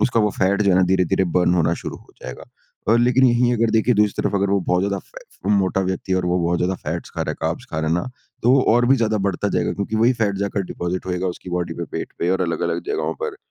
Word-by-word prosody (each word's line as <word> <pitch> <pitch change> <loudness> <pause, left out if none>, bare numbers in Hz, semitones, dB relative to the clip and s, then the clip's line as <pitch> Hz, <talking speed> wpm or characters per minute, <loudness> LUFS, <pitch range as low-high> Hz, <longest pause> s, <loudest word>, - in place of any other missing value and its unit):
उसका 115 -2 +2
वो 105 -1 +2
फैट 100 +2 +2
जो 100 - +3
है 90 - +4
ना 95 - +4
धीरे-धीरे 95 0 +2
बर्न 90 0 +3
होना 85 -1 +2
शुरू - - -5
हो - - -20
जाएगा। - - -8 0.4
अ, 110 - +5
लेकिन 125 +2 +3
यहीं 120 0 +3
अगर 115 -1 +1
देखें, 115 +2 +2
दूसरी 105 -1 +1
तरफ - - -1
अगर 100 0 +1
वो 100 - +3
बहुत 90 0 0
ज़्यादा 100 0 -1
फै - - -13 0.2
फ 100 - -1
मोटा 95 0 +1
व्यक्ति 95 0 -2
है - - +3
और 90 - -2
वो 90 +1 +1
बहुत 85 +1 +1
ज़्यादा 90 +2 0
फैट्स 85 -1 -5
खा - - -3
रहा - - -3
है, - - -5
कार्ब्स - - -2
खा 80 - -3
रहा 80 0 -1
है 80 - +2
ना, 85 +7 -2 0.3
तो 120 - +4
वो 135 -1 +5
और 120 0 +3
भी 135 +2 +5
ज़्यादा 110 -3 0
बढ़ता 100 +2 -2
जाएगा - - 0
क्योंकि 100 +2 -3
वही 115 +3 +4
फैट 100 -2 +1
जाकर 100 0 -1
डिपॉज़िट 90 +1 -4
होएगा 90 0 -2
उसकी 90 0 -6
बॉडी 90 -2 -2
पे, 85 - -4
पेट - - -6
पे 85 - 0
और 95 - +1
अलग 85 -2 -2
अलग - - -1
जगहों 420 0 -2
पर। 455 -4 -3
95 Hz, 285 wpm, -21 LUFS, 90-110 Hz, 0.4 s, अ